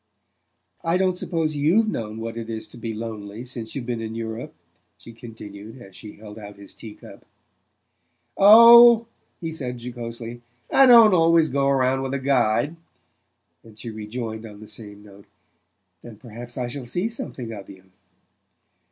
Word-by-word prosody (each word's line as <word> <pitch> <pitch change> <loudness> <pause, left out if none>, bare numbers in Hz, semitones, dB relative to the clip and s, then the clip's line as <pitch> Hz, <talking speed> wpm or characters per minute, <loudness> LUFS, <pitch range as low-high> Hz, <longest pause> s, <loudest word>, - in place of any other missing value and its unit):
"I 165 +2 +1
don't 185 -1 +1
suppose 165 -4 -2
YOU'VE 170 +10 +2
known 110 - -4
what 115 0 -6
it 115 -1 -7
is 110 -1 -6
to - - -15
be 115 -1 -5
lonely 110 0 -7
since 120 -3 -7
you've 135 -4 -5
been 120 -2 -4
in 110 0 -6
Europe?" 115 -2 -6 0.4
she 115 - -14
continued 110 -1 -11
as 95 -6 -15
she 105 -2 -11
held 105 0 -12
out 100 -1 -11
his 100 -1 -13
tea 110 -2 -11
cup. - - -15 1.1
"Oh," 235 +3 +8 0.3
he 165 -1 -5
said 125 -5 -5
jocosely, 120 -1 -8 0.3
"I 270 - +6
don't 230 -4 +8
always 165 -2 +4
go 140 0 0
round 135 -1 +1
with 135 +1 -3
a - - -2
guide"; 135 +3 0 0.9
and 110 -2 -17
she 115 +1 -7
rejoined 110 +1 -6
on 105 -2 -11
the 110 - -12
same 105 -2 -11
note: 100 -1 -17 0.7
"Then 115 -3 -12
perhaps 120 +1 -11
I 125 -1 -2
shall 130 +2 -7
see 175 - -2
something 180 - -7
of 100 -2 -10
you." 95 -1 -14
120 Hz, 165 wpm, -23 LUFS, 110-145 Hz, 1.1 s, Oh